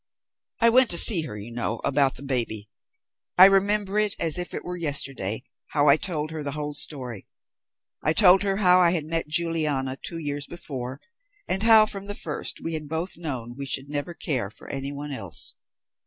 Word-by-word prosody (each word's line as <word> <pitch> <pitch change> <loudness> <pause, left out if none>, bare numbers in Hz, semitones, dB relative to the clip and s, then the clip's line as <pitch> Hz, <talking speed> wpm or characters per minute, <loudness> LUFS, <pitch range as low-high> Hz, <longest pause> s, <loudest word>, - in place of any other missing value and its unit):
I 230 - +6
went 255 +1 +5
to 170 - +5
see 175 -1 +9
her, 105 - -8
you 105 +3 -9
know, 115 -1 -3
about 140 -1 +1
the 135 - -11
baby. 115 -6 -2 0.7
I 185 - +10
remember, 200 +1 +2
as 180 -6 -1
if 175 - -4
it - - -6
was 180 -1 -6
yesterday, 135 - -2 0.3
how 145 -1 +3
I 140 - +7
told 155 -3 -4
her 160 -1 -6
the 140 -1 -4
whole 150 0 -4
story. 125 -8 -1 0.8
I 155 - +3
told 185 +1 +5
her 195 -1 -1
how 180 -3 +4
I 175 -1 +4
had 160 -4 -2
met 165 0 -2
Juliana 150 -5 -1
two 170 - -4
years 145 -2 -4
before, 130 -6 -7 0.5
and 190 +1 -1
how, 220 -1 +6
from 200 -2 -5
the 205 0 -5
first, 150 -6 -3
we 165 - -3
had 155 -2 -5
both 160 +4 -3
known 130 -8 -5
we 140 +1 -6
should 135 +1 -3
never 150 +4 -4
care 125 -12 -2
for 105 - -14
anyone 140 +2 -5
else. 100 - -4
150 Hz, 190 wpm, -24 LUFS, 135-180 Hz, 0.8 s, I